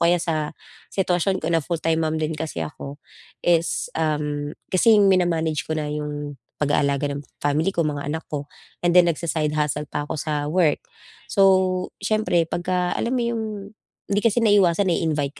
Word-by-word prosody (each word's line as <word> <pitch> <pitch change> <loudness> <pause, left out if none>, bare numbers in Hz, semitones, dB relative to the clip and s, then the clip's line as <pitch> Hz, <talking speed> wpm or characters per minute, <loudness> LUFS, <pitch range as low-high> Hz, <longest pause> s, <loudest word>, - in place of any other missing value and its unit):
kaya 170 +1 +5
sa 155 -3 -2 0.4
sitwasyon 190 0 +1
ko 160 - -2
na 165 - +3
full-time 165 -1 0
mom 155 0 -1
din 155 +1 -1
kasi 155 - -4
ako 140 - -8 0.5
is 170 -1 +2
um, 150 -2 -1 0.2
kasi 215 +4 +5
mina-manage 175 -5 +2
ko 160 - -1
na 155 - -2
'yong, 145 -2 -5 0.2
pag-aalaga 145 -1 +1
ng 140 0 -5 0.2
family 150 +6 +1
ko, 170 - -1
mga 145 -1 -4
anak 155 +3 -2
ko 145 -1 -3 0.4
and 175 - +3
then 175 0 +6
nagsa-side 155 -2 -1
hustle 150 -1 -1
pa 145 0 -3
ako 150 0 -4
sa 150 -2 -2
work. 155 0 +1 0.5
So, 200 - +1 0.6
siyempre 215 -5 +2
pagka 180 +2 -1
alam 250 +3 -1
mo 245 - +1
'yong, 235 -1 -1 0.7
hindi 205 - +3
kasi 230 +1 +2
naiwasan 200 -3 +4
nai-invite 150 -5 0
160 Hz, 165 wpm, -23 LUFS, 150-180 Hz, 0.7 s, then